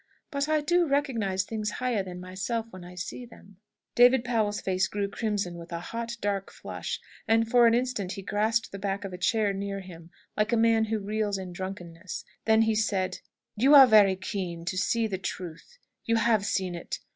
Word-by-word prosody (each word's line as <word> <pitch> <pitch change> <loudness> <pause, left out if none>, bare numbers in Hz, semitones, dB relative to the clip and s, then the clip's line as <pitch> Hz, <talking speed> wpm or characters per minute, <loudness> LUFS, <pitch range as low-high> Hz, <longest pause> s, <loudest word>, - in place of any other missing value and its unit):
But 280 0 -1
I 310 -1 +3
do 345 +3 +2
recognise 235 -10 0
things 215 0 -3
higher 250 -5 0
than 180 -1 -7
myself 190 +5 -3
when 185 -1 -10
I 180 +1 -11
see 180 +7 -6
them." 200 -5 -15 0.4
David 245 0 +6
Powell's 220 -4 0
face 185 0 0
grew 200 -1 -2
crimson 200 -4 -2
with 170 +1 -11
a 170 - -3
hot, 230 +6 -5
dark 200 -1 -2
flush, - - -5 0.3
and 225 0 +3
for 240 0 +6
an 230 - +4
instant 240 -7 -1
he 195 - -7
grasped 215 +3 0
the 195 - -7
back 195 0 -2
of 190 - -6
a - - -5
chair 210 +1 +1
near 195 0 -4
him, 170 -3 -11 0.3
like 210 0 +1
a 235 - +3
man 225 0 +4
who 220 0 -1
reels 210 0 -1
in 185 -2 -7
drunkenness. 180 -2 -7 0.2
Then 220 0 +5
he 225 0 +2
said, 205 -3 0 0.4
"You 270 +7 +5
are 275 -2 +11
very 210 -5 +6
keen 185 -3 -5
to 180 - -2
see 225 +4 +1
the 195 -4 -3
truth. 185 - -7 0.3
You 230 - +1
have 220 -2 +2
seen 185 -2 -1
it. 170 - -5
205 Hz, 200 wpm, -28 LUFS, 185-230 Hz, 0.4 s, are